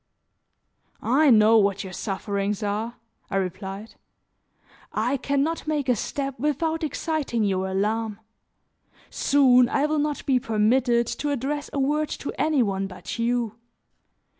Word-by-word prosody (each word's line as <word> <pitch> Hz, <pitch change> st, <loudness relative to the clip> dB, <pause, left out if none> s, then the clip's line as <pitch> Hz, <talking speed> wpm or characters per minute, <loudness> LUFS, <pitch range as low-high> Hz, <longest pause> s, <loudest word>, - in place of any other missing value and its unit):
"I 280 Hz, +5 st, +4 dB
know 220 Hz, -1 st, +6 dB
what 200 Hz, -1 st, +1 dB
your 190 Hz, -1 st, -8 dB
sufferings 200 Hz, +1 st, -2 dB
are," 215 Hz, +4 st, -2 dB, 0.3 s
I -, -, -3 dB
replied. 195 Hz, +3 st, -4 dB, 1.0 s
"I 245 Hz, +6 st, 0 dB
can 280 Hz, +1 st, 0 dB
not 325 Hz, +1 st, -3 dB
make 295 Hz, -3 st, -1 dB
a 250 Hz, -, +3 dB
step 275 Hz, +3 st, -4 dB
without 315 Hz, +4 st, -1 dB
exciting 305 Hz, -7 st, -1 dB
your 190 Hz, -2 st, 0 dB
alarm. 210 Hz, +3 st, -1 dB, 0.9 s
Soon 255 Hz, -3 st, +4 dB
I 280 Hz, -, +1 dB
will 305 Hz, 0 st, 0 dB
not 295 Hz, 0 st, -2 dB
be 260 Hz, -2 st, +3 dB
permitted 235 Hz, +1 st, +2 dB
to 295 Hz, +5 st, -3 dB
address 285 Hz, +2 st, -2 dB
a -, -, -4 dB
word 295 Hz, +3 st, +1 dB, 0.2 s
to -, -, -3 dB
any 305 Hz, -5 st, +3 dB
one 195 Hz, -2 st, -1 dB
but 185 Hz, +5 st, -8 dB
you. 235 Hz, -1 st, -1 dB
240 Hz, 140 wpm, -25 LUFS, 210-285 Hz, 1.0 s, know